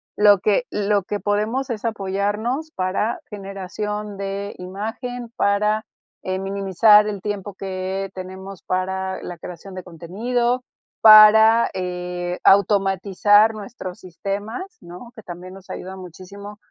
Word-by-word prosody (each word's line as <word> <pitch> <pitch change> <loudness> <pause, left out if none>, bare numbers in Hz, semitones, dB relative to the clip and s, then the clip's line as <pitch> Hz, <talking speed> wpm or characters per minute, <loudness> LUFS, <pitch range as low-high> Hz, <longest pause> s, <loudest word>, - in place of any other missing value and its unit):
lo 205 -2 +6
que 210 +5 +1
lo 205 -1 +1
que 205 +3 -4
podemos 215 +7 -1
es 220 -1 -5
apoyarnos 215 +8 -2
para 190 +5 -1
generación 205 +1 -5
de 200 +1 -4
imagen, 225 +6 -6
para, 210 +2 +1 0.4
eh, 185 0 -2
minimizar 200 +2 +4
el 205 -3 -4
tiempo 205 -1 -4
que 190 0 -4
tenemos 190 0 -9
para 190 +1 -2
la 175 - -7
creación 180 +3 -10
de 185 - -7
contenido, 235 +9 -2 0.4
para, 220 +1 +8
eh, 180 -1 -4
automatizar 200 +2 +4
nuestros 205 -2 -8
sistemas, 205 - -6
¿no? 180 +8 -11
Que 220 - -10
también 180 +1 -9
nos 190 -1 -14
ayuda 190 +1 -7
muchísimo. 190 +3 -11
200 Hz, 120 wpm, -21 LUFS, 185-215 Hz, 0.4 s, para